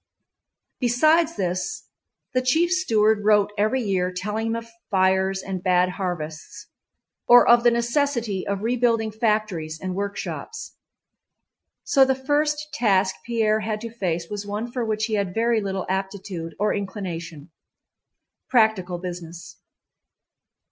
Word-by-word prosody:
Besides 310 +7 +3
this 185 - -3 0.5
the 255 - +2
chief 320 +8 +2
steward 220 - +2
wrote 210 -1 +3
every 215 +5 +1
year 185 -3 0
telling 210 +5 -3
him 225 - -1
of 230 0 -5 0.2
fires 190 0 +2
and 190 -2 -4
bad 180 0 +3
harvests, 175 -5 -5 0.6
or 245 0 +8
of 240 0 +7
the 240 - +6
necessity 235 -4 0
of 200 0 -2
rebuilding 230 -2 +1
factories 210 -8 -1
and 185 +1 -4
workshops. 200 - -5 1.1
So 275 - +4
the 265 0 +2
first 295 +3 -1
task 195 -8 +2
Pierre 220 -2 +1
had 215 0 -3
to 230 -1 -6
face 175 -6 -2
was 205 +1 -5
one 210 +4 -4
for 245 -1 -2
which 220 -1 -1
he 220 - -4
had 200 -3 -1
very 230 0 +2
little 195 -2 -3
aptitude 190 -3 -4
or 210 +1 +1
inclination—practical 185 - -3
business. 175 -2 -8
210 Hz, 125 wpm, -23 LUFS, 185-235 Hz, 1.1 s, or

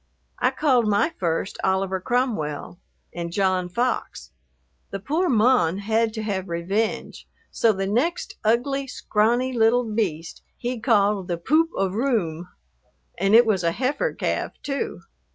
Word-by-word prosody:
I - - +3
called 255 -7 +2
my 210 +10 +2
first 170 +1 -2
"Oliver 190 0 0
Cromwell" 190 - -2 0.3
and 170 -1 -5
"John 185 -1 0
Fox." 245 - -2 0.6
The 195 - -5
poor 320 - 0
"mon" 215 - +3
had 220 +2 +1
to 220 - -3
have 195 -3 -3
revenge, 195 +6 -2 0.2
so 230 - +3
the 195 -2 -2
next 320 - -1
ugly, 270 +5 +1
scrawny 240 +2 0
little 235 +1 +3
beast 205 -8 -3 0.2
he 245 0 -3
called 205 -4 +2
the 175 - -2
"Poop 310 - +2
of 190 -1 0
Roome." 200 - -1 0.7
And 195 +3 +4
it 240 +1 +8
was 200 -5 +1
a 170 0 +1
heifer 265 - -1
calf, - - -2
too. 280 -1 -3
215 Hz, 140 wpm, -24 LUFS, 190-245 Hz, 0.7 s, it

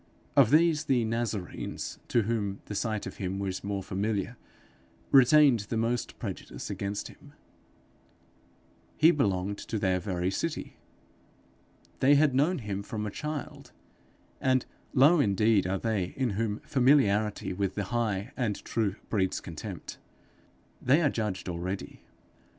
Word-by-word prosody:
Of 135 -6 +6
these 155 +1 +4
the 125 -5 +2
Nazarenes, 110 -4 -3
to 120 - +2
whom 100 -3 -2
the - - -6
sight 110 0 -2
of - - -7
him 95 0 -3
was 95 -1 -3
more 100 -1 -3
familiar, 100 +4 -2 0.8
retained 135 -1 +6
the 115 - -1
most 115 +1 -1
prejudice - - -6
against 100 +1 -4
him: - - -16 1.6
he 160 +2 +7
belonged 100 - 0
to 110 - -4
their 95 -3 +1
very 90 -1 -2
city! 165 +10 -4 1.2
they 140 +2 +5
had 145 -1 +4
known 150 +8 +2
him 100 -5 -4
from 105 +1 -4
a 105 - -3
child! 150 +3 -6 0.7
and 130 -1 +2 0.3
low 150 +6 +6
indeed 105 -4 +3
are 95 +1 0
they 100 -4 -2
in 130 -4 0
whom 105 +1 -2
familiarity 115 -8 +2
with 95 0 -2
the 100 - -1
high 110 -1 -1
and 110 -6 -2
true 105 -4 0 0.2
breeds 95 -4 +1
contempt! 80 -4 -8 0.8
they 140 +7 +4
are 145 - +3
judged 105 -5 -3
already. 90 +2 -5
110 Hz, 135 wpm, -29 LUFS, 100-130 Hz, 1.6 s, he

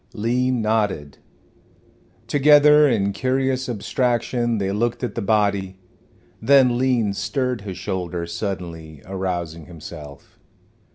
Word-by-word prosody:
Lean 125 +2 0
nodded. 105 -10 -1 1.1
Together 150 +1 +6
in 100 -4 0
curious 130 +2 -1
abstraction 120 +1 -1
they 95 -1 -1
looked 115 +5 -1
at 125 - -2
the 115 - -3
body. 100 -2 0 0.6
Then 125 0 +4
Lean 120 -6 +1
stirred 125 +2 -2
his 95 -3 -7
shoulders 90 -3 -4
suddenly, 85 -7 -6
arousing 90 -4 -4
himself. 75 -4 -11
105 Hz, 105 wpm, -22 LUFS, 95-125 Hz, 1.1 s, Together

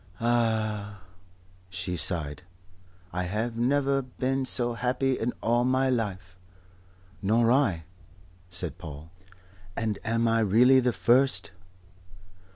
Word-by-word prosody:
Ah!" 110 -4 -1 0.7
she 90 0 -4
sighed. 80 -4 +2 0.7
"I 90 +1 -2
have 110 +6 -3
never 135 +3 +1
been 130 +1 -3
so 120 -1 +2
happy 125 +2 -1
in 120 +2 -1
my 130 +3 +2
life." 95 -6 -3 0.9
"Nor 115 +3 +2
I," 110 - +1 0.7
said 90 -3 -2
Paul. 80 -1 -10 0.7
"And 110 -3 -2
am 115 +1 0
I 115 0 +2
really 120 +5 +5
the 125 -1 +1
first?" 130 +2 +2
115 Hz, 105 wpm, -27 LUFS, 95-125 Hz, 0.9 s, really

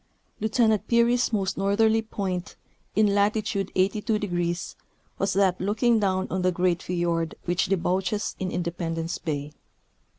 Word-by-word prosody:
Lieutenant 220 0 +2
Peary's 235 +1 +3
most 195 -3 -1
northerly 220 +3 +3
point, 195 -4 -4 0.4
in 210 -1 +4
latitude 200 -1 0
§2°, 185 -3 0 0.5
was 195 - +1
that 190 -2 +2
looking 220 +4 +2
down 190 -2 0
on 185 - -1
the 185 0 +2
great 175 -1 +1
fiord 170 -2 -1
which 175 0 +1
de 195 +1 +2
bouches 185 +4 -1
in 185 - -2
Independence 170 -1 -3
bay. 145 -2 -3
190 Hz, 130 wpm, -26 LUFS, 175-210 Hz, 0.5 s, in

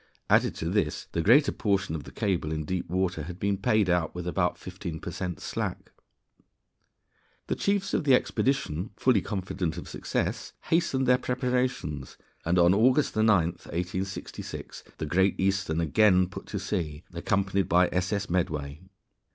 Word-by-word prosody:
Added - - +4
to 80 - -3
this, 95 -7 0
the 85 - 0
greater 130 - +5
portion 100 -5 0
of 75 -4 -5
the - - -10
cable 90 -6 -1
in 80 -1 -2
deep 90 +1 -3
water 90 -2 0
had 85 +4 -7
been 100 0 +1
paid 100 +1 +2
out 90 -2 +1
with 90 -1 -5
about 90 0 0
15 90 -3 -7
per 85 - -6
cent 90 -1 -4
slack. - - -4 1.5
The - - -1
chiefs 200 -1 0
of - - +1
the 135 -3 +6
expedition, 125 - 0
fully 120 -7 +3
confident 90 -3 -3
of 85 - -7
success, - - -3 0.2
hastened 140 -5 +2
their 125 0 +4
preparations, 125 - -2 0.3
and 85 +2 +1
on 85 +1 +6
August 125 +8 +3
9, 110 0 +3
1866, 90 0 -2
the 80 - -3
Great 95 +5 +2
Eastern 95 -4 +1
again 90 +2 +4
put - - -9
to - - -4
sea, 75 -2 -3
accompanied 95 +2 0
by 90 +1 +5
S.S. 100 +2 -1
Medway. 75 -4 -2
95 Hz, 155 wpm, -28 LUFS, 85-105 Hz, 1.5 s, the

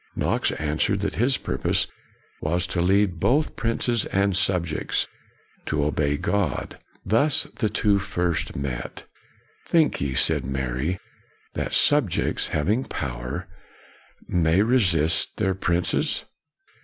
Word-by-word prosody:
Knox - - +1
answered 75 +6 0
that 100 - -1
his 130 +4 +2
purpose - - 0 0.6
was 85 +3 0
to 90 -1 -1
lead 95 -1 +2
both 145 - +2
princes 115 0 0
and 100 -1 +1
subjects 90 -4 +1 0.6
to 75 -1 0
obey 75 -1 0
God. 90 -4 -1 0.3
Thus 115 +9 +2
the 110 -6 +1
two 105 -1 +2
first 90 -4 -2
met. 65 -3 -5 0.3
" - - -34
Think 160 -3 +3
ye," 70 -2 -1
said 65 - +2
Mary, 65 +6 -2 0.3
" - - -36
that - - -3
subjects, 145 - +2
having 105 - 0
power, 60 -1 -5 0.8
may 85 +3 +3
resist 90 -10 +2
their 95 - +1
princes? 90 -2 0
90 Hz, 120 wpm, -24 LUFS, 75-105 Hz, 0.8 s, Think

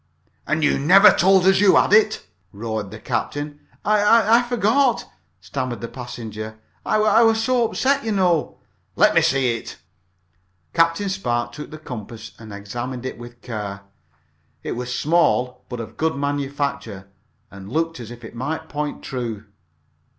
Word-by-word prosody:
"And 155 0 0
you - - +2
never 195 +8 +7
told 190 +1 +4
us 190 - +5
that - - +2
you 200 -2 +6
had - - +4
it!" 215 0 +4 0.3
roared 110 0 -4
the 110 - -9
captain. 145 +6 -4 0.3
"I 215 +2 +5
I - - +1
forgot 245 +2 +2
it!" - - -22 0.3
stammered 130 -3 -4
the 115 - -5
passenger. 110 -3 -7 0.3
"I - - 0
I 215 +1 +4
was 225 -1 +3
so 240 -1 +2
upset, 280 +1 +1
you 225 - -2
know." 180 -5 +1 0.4
"Let - - +4
me - - +5
see 130 -3 +2
it." 110 - -10 1.0
Captain 165 +4 +2
Spark 120 -12 -2
took 150 - -9
the 155 - -9
compass 115 -6 -8
and 110 -2 -11
examined 120 +5 -6
it 130 - -5
with 120 0 -12
care. 105 -4 -5 0.8
It - - -4
was 125 +1 -4
small, 125 -6 +1
but 125 - -5
of 110 -1 -8
good 160 -1 0
manufacture, 140 -7 -3 0.4
and 100 +1 -11
looked 165 0 -1
as 115 -2 -8
if 120 0 -11
it - - -10
might 160 +6 -4
point 150 0 -4
true. 115 -5 -4
140 Hz, 165 wpm, -22 LUFS, 115-190 Hz, 1.0 s, never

